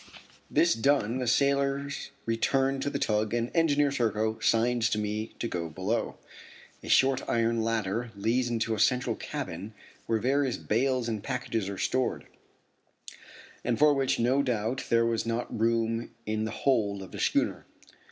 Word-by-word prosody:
This 170 0 +3
done 125 -1 +1
the 125 - -2
sailors 140 +2 +1 0.2
return 135 +4 +1
to 140 - -1
the 140 - -2
tug 110 -2 0
and 120 0 -1
Engineer 145 -4 +3
Serko 110 -4 0
signs 120 0 +2
to - - 0
me 105 +1 -3
to 115 - -2
go 85 -5 -3
below. 100 +8 -2 0.6
A - - -9
short 135 0 +4
iron 115 0 +1
ladder 115 +1 -1
leads 120 +5 0
into 115 -1 -1
a 110 - -3
central 125 +3 +2
cabin 100 +6 -6 0.3
where 115 - +2
various 130 +2 +1
bales 125 +2 0
and 110 -3 -2
packages 120 -6 -2
are 100 - -5
stored, 130 +5 -1 1.4
and 120 -2 0
for 150 0 +5
which 135 -2 +1
no 125 +4 +2
doubt 125 -1 -1
there 115 0 +4
was 115 0 -1
not 115 0 -3
room 115 0 +1 0.2
in 110 0 -1
the - - -3 0.2
hold 105 -7 +2
of 95 - -11
the - - -8
schooner. - - 0
115 Hz, 160 wpm, -28 LUFS, 110-130 Hz, 1.4 s, for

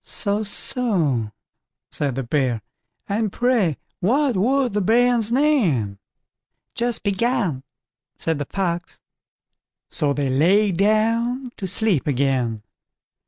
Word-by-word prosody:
"So, 205 0 -1
so", 195 - 0 0.6
said 140 -4 -2
the 135 - -2
Bear, 125 -4 0 0.4
"and 210 0 -1
pray 235 - +1 0.2
what 260 +6 +2
was 250 +6 +2
the 205 +1 0
bairn's 235 +2 +3
name." 190 - +1 0.7
"Just 240 -1 -1
begun", 200 - 0 0.6
said 160 -2 -1
the 145 - -2
Fox. 175 -3 -3 0.9
So 145 -2 0
they 140 0 -1
lay 190 +10 +3
down 230 +6 +1
to 190 - -4
sleep 195 - 0
again. 125 -5 0
200 Hz, 110 wpm, -22 LUFS, 145-235 Hz, 0.9 s, bairn's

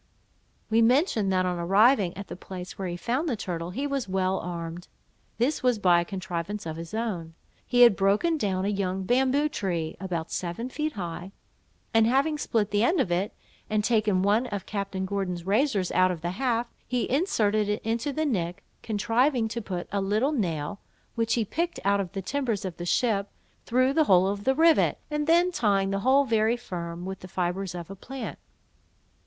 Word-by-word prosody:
We 225 +1 +4
mentioned, 230 - +3
that 185 -1 +2
on 180 -1 -1
arriving 195 +2 +4
at 200 - -6
the - - -8
place 180 0 -8
where 190 - -4
he 175 0 -4
found 260 - -1
the 245 - 0
turtle, 175 -4 -4
he 265 +10 -3
was 275 -7 -2
well 190 0 0
armed. 170 0 -6 0.5
This 255 +7 +1
was 250 -3 +2
by 180 -4 +4
a - - -4
contrivance 190 +1 -4
of 160 -1 -4
his 165 +5 -7
own. 180 -8 -3 0.3
He 245 -1 +3
had 235 -4 +8
broken 205 - +2
down 195 -9 -1
a - - +1
young 195 -2 -1
bamboo 265 +7 +2
tree, 175 - -3
about 175 -4 -4
seven 185 +8 -3
feet 305 +3 -2
high, 175 0 -6 0.6
and 225 0 +5
having 280 +5 +2
split 215 -7 0
the 205 +1 +2
end 340 +9 +3
of 175 - +1
it, 185 +4 -1 0.3
and 215 -1 +1
taken 215 -4 +2
one 215 +5 +2
of 200 -4 -5
Captain 200 -2 -3
Gordon's 185 -3 -3
razors 205 -2 +1
out 185 0 +4
of 175 -3 -4
the 175 +1 -2
haft, 235 +2 -1 0.2
he 250 -1 -1
inserted 215 - +1
it 210 - -1
into 230 +6 -1
the 310 +3 -1
nick, 180 - -2 0.2
contriving 230 +3 +1
to 235 +2 -4
put 180 -4 -5
a 200 0 0
little 215 +8 +1
nail, 180 - -2 0.3
which 230 0 0
he 230 -2 0
picked 340 - -2
out 200 0 +3
of 185 -2 -6
the 195 -2 -4
timbers 235 -5 -2
of 180 -3 -5
the 175 - -5
ship, 205 -2 +1 0.4
through 255 +3 +3
the 315 +1 +3
hole 185 -5 +5
of 200 +1 -3
the 265 - +3
rivet, 325 +1 +4
and 300 0 -1
then 345 +2 +4
tying 200 - +1
the 195 - 0
whole 265 +5 +4
very 225 -1 +2
firm, 175 -6 -6
with 190 0 -5
the 185 - -10
fibres 180 0 -2
of 175 +1 -7
a - - -7
plant. 265 +7 -7
205 Hz, 195 wpm, -27 LUFS, 185-245 Hz, 0.6 s, had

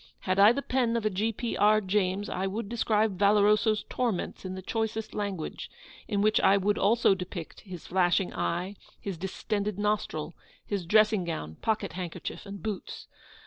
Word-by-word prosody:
Had 185 +1 0
I 205 +2 +8
the 275 +3 -2
pen 245 -3 +1
of 225 - -3
a 215 - +2
G. 210 +4 0
P. 230 +2 -4
R. 215 +1 +5
James, 195 0 0
I 190 +1 -2
would 200 +2 -4
describe 215 -3 +1
Valoroso's 210 +1 +4
torments 235 -8 -2
in 185 0 -5
the 190 - -7
choicest 220 +1 -2
language; 200 -6 -4 0.4
in 205 -1 0
which 215 0 +4
I 195 - +5
would 205 +1 +1
also 225 -1 +4
depict 180 -3 -6
his 185 -5 -10
flashing 180 0 +1
eye, 175 - -2 0.2
his 195 -2 -4
distended 200 +2 -2
nostril 205 -7 -1 0.3
his 195 -5 -3
dressing 215 0 +4
gown, 80 - -5
pocket 215 -2 -1
handkerchief, 180 +2 -6
and 200 -1 -8
boots. 215 -3 -5
205 Hz, 170 wpm, -28 LUFS, 185-215 Hz, 0.4 s, I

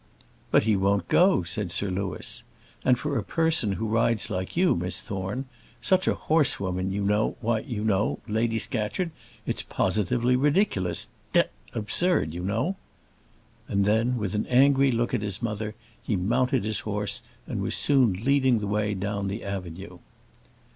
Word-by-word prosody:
"But - - +4
he 110 -1 +2
won't 100 -2 +1
go," 180 - +4
said 90 +2 -3
Sir 95 +2 +1
Louis. 90 -2 -3 0.4
"And 125 -1 +4
for 145 +2 -3
a - - -3
person 160 - +2
who 95 +4 -3
rides 115 0 +2
like 95 - -4
you, 180 0 +4
Miss 90 +1 -1
Thorne 100 +8 -4 0.3
such 185 0 +2
a - - +3
horsewoman 95 - +1
you 100 +1 -2
know 105 +2 +1
why, 115 -1 0
you 110 -4 -5
know, 105 -1 +1
Lady 115 +1 0
Scatcherd, 125 - -1 0.3
it's - - -2
positively 120 +6 +1
ridiculous; 135 - +1 0.3
d - - +6 0.3
absurd, 110 - +1
you 85 - -5
know." 115 - -1 0.9
And 100 0 +1
then, 115 +4 +2
with 105 -3 -2
an 105 - -1
angry 135 +2 +5
look 120 -1 0
at - - +1
his 100 -1 -2
mother, 110 -2 -3 0.3
he 110 - -1
mounted 115 +4 +1
his 110 -1 +1
horse, 105 -2 -2 0.2
and - - -4
was - - 0
soon 135 -6 +4
leading 130 +4 +2
the 105 - -3
way 105 0 0
down 100 +1 -2
the 100 +3 -4
avenue. 90 -2 -6
105 Hz, 160 wpm, -26 LUFS, 100-125 Hz, 0.9 s, d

